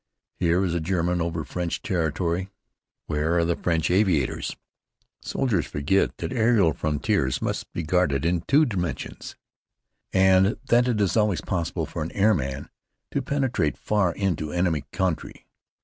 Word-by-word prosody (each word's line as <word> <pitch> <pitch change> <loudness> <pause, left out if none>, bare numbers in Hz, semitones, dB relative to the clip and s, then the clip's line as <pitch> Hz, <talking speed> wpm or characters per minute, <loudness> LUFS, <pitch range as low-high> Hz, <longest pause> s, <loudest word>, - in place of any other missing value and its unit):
Here 90 +1 +2
is 85 - -1
a 85 - 0
German 90 +1 0
over 85 -1 -2
French 90 -3 -3
territory. 85 +2 -1 0.6
Where 80 +2 0
are 85 - +3
the 85 0 +1
French 85 -1 0
aviators? 90 - +1 0.7
Soldiers 115 - -1
forget 75 +7 0
that - - -4
aerial 110 - +3
frontiers 75 - 0
must - - -3
be 85 - -4
guarded 80 -3 +1
in 85 0 +1
two 150 +3 +5
dimensions, 90 - -4 0.8
and 95 +2 +4
that 120 +1 +4
it 120 -4 0
is 100 - +1
always 105 -5 +2
possible 85 -3 -2
for 75 +2 -6
an 80 - -3
airman 75 -10 +1 0.4
to - - 0
penetrate 130 - 0
far 100 -5 +1
into 85 -6 -1
enemy 85 -4 0
country. 95 -4 -2
90 Hz, 145 wpm, -25 LUFS, 80-100 Hz, 0.8 s, two